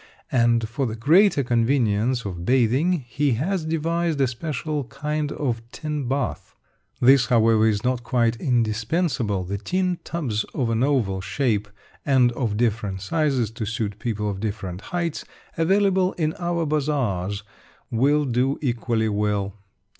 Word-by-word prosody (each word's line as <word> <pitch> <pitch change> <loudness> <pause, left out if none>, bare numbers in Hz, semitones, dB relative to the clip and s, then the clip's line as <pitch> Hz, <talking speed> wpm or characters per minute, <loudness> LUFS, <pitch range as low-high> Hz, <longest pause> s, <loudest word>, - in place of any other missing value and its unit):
And 115 -2 +3
for 125 +4 -2
the 110 - -4
greater 155 - +4
convenience 120 -1 +1
of 90 -3 -5
bathing, 130 - +2
he 140 +1 +1
has 170 - -1
devised 165 0 -1
a 135 - +4
special 145 +3 -3
kind 150 +3 -3
of 120 -6 -2
tin 150 -4 -4
bath. 130 - -3 0.4
This, 130 0 +5
however, 115 -2 +4
is 105 0 0
not 125 -1 0
quite 120 -1 +1
indispensable; 115 - 0
the 100 +2 -4
tin 180 - -1
tubs 125 -11 -2
of 120 -4 0
an 115 0 0
oval 120 -9 +1
shape 105 +1 0 0.4
and 130 -3 +4
of 115 -4 -2
different 105 -4 0
sizes 135 - 0
to 115 0 -5
suit 105 -2 -3
people 105 -2 -2
of 100 -2 -3
different 100 -3 -4
heights, 170 -3 -2 0.3
available 190 +2 +2
in 155 -2 -1
our 170 -1 -1
bazaars, 120 - -1 0.5
will 145 +6 +3
do 130 +2 +1
equally 120 -4 0
well. 105 -1 -1
125 Hz, 140 wpm, -23 LUFS, 110-150 Hz, 0.5 s, This